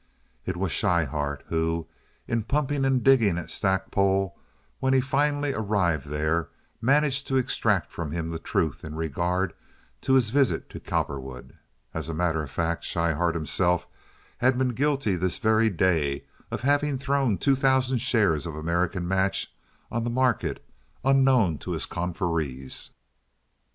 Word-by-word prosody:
It 90 -1 -2
was 95 -1 -1
Schryhart 75 -6 0
who, 80 0 0 0.4
in 115 0 0
pumping 140 +3 0
and 130 -3 +2
digging 115 -10 +5
at 90 - -5
Stackpole 95 0 +1 0.4
when 130 0 +2
he 135 - +5
finally 145 +1 +1
arrived 95 - 0
there, 75 +3 0 0.3
managed 140 +2 +2
to 135 - +1
extract 130 - +1
from 80 -4 -5
him 85 0 -3
the 80 0 -4
truth 80 -2 -1
in 80 -1 -6
regard 85 +4 -1 0.5
to 130 - +1
his 125 -5 +4
visit 140 -1 +1
to - - -7
Cowperwood. 65 -1 -4 0.4
As - - -4
a 80 - -3
matter 80 -2 +1
of 75 - -6
fact, 85 +4 -1
Schryhart 85 0 0
himself 85 +2 +1 0.5
had 130 +1 +3
been 130 0 +2
guilty 135 -4 +1
this 90 0 -1
very 110 0 +3
day 80 -7 +1 0.2
of - - -4
having 145 +1 +2
thrown 135 -5 +1
two 140 -1 +3
thousand 130 -1 +2
shares 100 - +2
of 80 - -6
American 85 +3 -1
Match 95 +1 0 0.4
on 120 0 -1
the 120 - -1
market 125 -1 0 0.4
unknown 130 - +4
to - - -4
his - - -3
confreres. 85 -7 -3
95 Hz, 145 wpm, -26 LUFS, 80-130 Hz, 0.5 s, digging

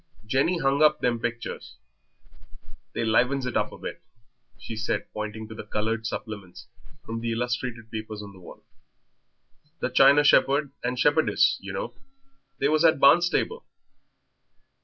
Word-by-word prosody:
Jenny 135 +10 +1
hung 140 -2 +1
up 150 0 +4
them 120 -2 +1
pictures. 120 0 -5 1.2
They 115 - -2
livens 125 +4 +2
it 125 - -4
up - - 0
a - - -10
bit," - - -7 0.6
she 115 - -8
said, 110 0 -2
pointing 110 +1 -5
to 110 - -9
the 110 - -8
coloured 110 +2 -2
supplements, 100 -5 -7 0.4
from 115 0 -4
the 115 0 -2
illustrated 120 -1 -3
papers, 110 -1 -6
on 100 -1 -11
the 95 - -15
wall. 90 - -13 1.2
"The 130 - -2
china 140 +3 +6
shepherd 140 0 +4
and 125 +1 -2
shepherdess, 145 -4 +3
you 100 0 -7
know; 95 +5 -4 0.6
they 140 - +1
was 155 +2 +2
at 160 -4 +4
Barnstaple." 175 - +3
120 Hz, 145 wpm, -26 LUFS, 110-140 Hz, 1.2 s, china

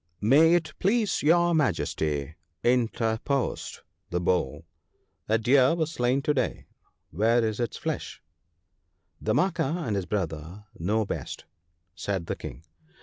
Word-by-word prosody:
' 85 0 -45 0.2
May 165 +3 +7
it 160 -3 -1
please 215 +2 +1
your 170 +3 +4
Majesty,' 80 - 0 0.3
interposed 120 +2 0 0.3
the 90 - -1
Bull, 80 -4 0 0.3
* 80 +2 -39
a 110 - +4
deer 130 +6 +4
was 160 -2 -1
slain 125 -1 +1
to 150 - +2
day 130 -4 -2 0.2
— - - -42
where 115 +6 +3
is 110 +1 -3
its 120 -3 -2
flesh? - - -4 0.5
' 90 -2 -48
1 110 - 0
Damanaka 170 -2 0
and 110 -4 -1
his 95 -2 -2
brother 85 0 -4
know 105 +6 +1
best,' - - -5 0.5
said 95 0 -3
the - - -3
King. 80 - -9
115 Hz, 145 wpm, -27 LUFS, 90-150 Hz, 0.5 s, May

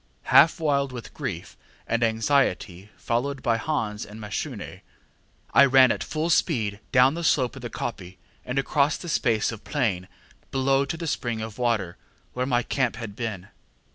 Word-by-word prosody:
Half 165 +2 +7
wild 140 -3 +1
with 120 -3 -8
grief - - -5 0.3
and 115 - -1
anxiety, 110 -5 0
followed 130 +3 -2
by 115 -3 +2
Hans 110 -5 -2
and 105 +2 -10
Mashune, 105 -2 -5 0.7
I 140 - +8
ran 130 -2 +6
at - - -2
full 160 +2 -2
speed 110 - +1
down 125 +2 +5
the 170 +1 -4
slope 130 -6 +2
of 135 - -9
the 120 - -5
koppie, 95 -7 -6 0.3
and 125 - -4
across 140 +1 +2
the 175 - -9
space 115 -9 +1
of 115 -2 -9
plain 105 -11 -1 0.4
below 135 +1 +2
to 150 +4 -4
the 165 - -5
spring 120 -7 -2
of 110 +1 -7
water, 110 -8 0 0.4
where 125 +1 -2
my 120 -2 +1
camp 130 -1 0
had 110 -4 -7
been. 105 -5 -5
120 Hz, 170 wpm, -25 LUFS, 110-140 Hz, 0.7 s, I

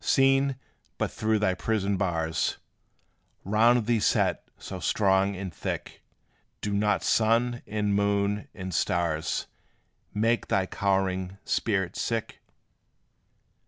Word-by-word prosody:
Seen 135 0 +3 0.4
but - - -1
through 110 0 +1
thy 100 -3 +2
prison 100 0 0
bars, 80 -4 -1 0.9
Round 115 +3 +3
thee 115 0 +2
set - - +1
so - - -7
strong 95 -1 +2
and 95 -2 -6
thick, - - -5 0.6
Do 105 - -3
not 105 0 +1
sun, 120 +2 +2
and 105 -1 0
moon, 100 0 +1
and 95 -2 -6
stars 80 -2 0 0.7
Make 115 +3 +1
thy 95 -1 +1
cowering 95 -1 -1
spirit 95 -5 0
sick? 115 -1 -3
100 Hz, 110 wpm, -27 LUFS, 95-110 Hz, 0.9 s, Seen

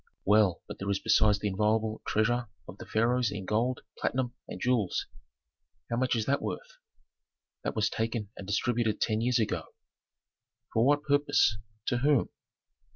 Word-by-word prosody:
"Well, 105 -3 +3
but - - -8
there 100 - -3
is 100 - +2
besides 105 -1 +4
the 105 - -2
inviolable 110 +2 0
treasure 120 +3 +1 0.2
of 95 - -10
the - - -9
pharaohs 120 +1 +2
in 100 -2 -5
gold, 115 +5 0 0.2
platinum, 125 -2 -1
and - - -7
jewels; 120 -7 +1 0.9
how 115 - 0
much 130 0 +1
is 110 -2 0
that 140 +1 +1
worth?" - - -6 0.8
"That - - -2
was 110 -1 +2
taken 110 -2 -2
and 95 - -9
distributed 110 +1 0
ten 110 0 +1
years 125 +1 +2
ago." 110 -3 -2 1.0
"For 115 - +3
what 145 +3 +3
purpose? 145 -7 +3 0.3
To 120 - 0
whom?" 140 0 +3
115 Hz, 160 wpm, -29 LUFS, 105-125 Hz, 1.0 s, besides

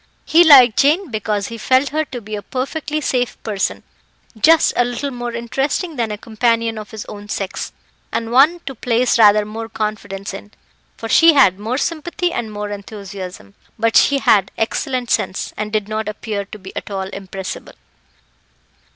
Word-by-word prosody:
He 335 +2 +6
liked 260 -8 +7
Jane 310 +3 +3
because 210 -2 -2
he 230 -1 -7
felt 260 +4 +2
her 310 +2 0
to 250 -4 -7
be 215 0 -6
a 205 - -5
perfectly 295 - -3
safe 250 -3 -1
person 205 -3 -2 0.5
just 315 +8 +4
a 245 - +4
little 245 +3 -3
more 240 -1 -5
interesting 270 +8 -2
than 235 -4 -1
a 210 - -4
companion 230 +1 0
of 210 - -9
his 220 -1 -7
own 205 0 -10
sex, 195 -2 -4 0.4
and 230 0 -3
one 300 +8 +5
to 275 - -6
place 245 0 +1
rather 210 -1 +6
more 225 +2 -6
confidence 210 -3 -4
in, 205 +2 -10 0.4
for 225 - -6
she 330 +7 +6
had 200 -10 +4
more 225 +5 -2
sympathy 345 +4 -2
and 230 -2 -3
more 205 0 -5
enthusiasm; 195 - -8 0.2
but 230 0 +1
she 280 - +5
had 200 -7 +3
excellent 250 +1 -2
sense, 185 - -1
and 210 0 -4
did 210 -2 -1
not 215 0 -3
appear 210 -1 -4
to 210 - -10
be 190 -1 -12
at - - -6
all 190 -1 -3
impressible. 190 -1 -7
225 Hz, 175 wpm, -19 LUFS, 205-260 Hz, 0.5 s, liked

